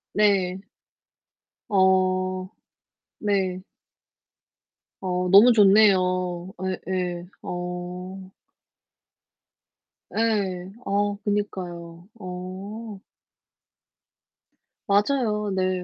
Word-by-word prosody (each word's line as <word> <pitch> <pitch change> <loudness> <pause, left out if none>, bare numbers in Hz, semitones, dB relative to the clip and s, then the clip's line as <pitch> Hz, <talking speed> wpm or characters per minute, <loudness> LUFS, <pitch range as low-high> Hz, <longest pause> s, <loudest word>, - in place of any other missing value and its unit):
네. 195 -3 +2 1.1
어 185 -1 +2 0.7
네. 190 -3 -1 1.4
어 180 -1 -1
너무 205 +6 +8
좋네요. 185 -4 +3 0.4
예예. 180 -2 -2 0.2
어. 180 +2 -6 1.8
예. 195 -5 -1
아 205 +1 0
그니까요. 175 -4 -4
어. 190 +4 -7 1.9
맞아요. 210 0 +1
네. 185 -1 0
185 Hz, 85 characters per minute, -24 LUFS, 180-205 Hz, 1.9 s, 너무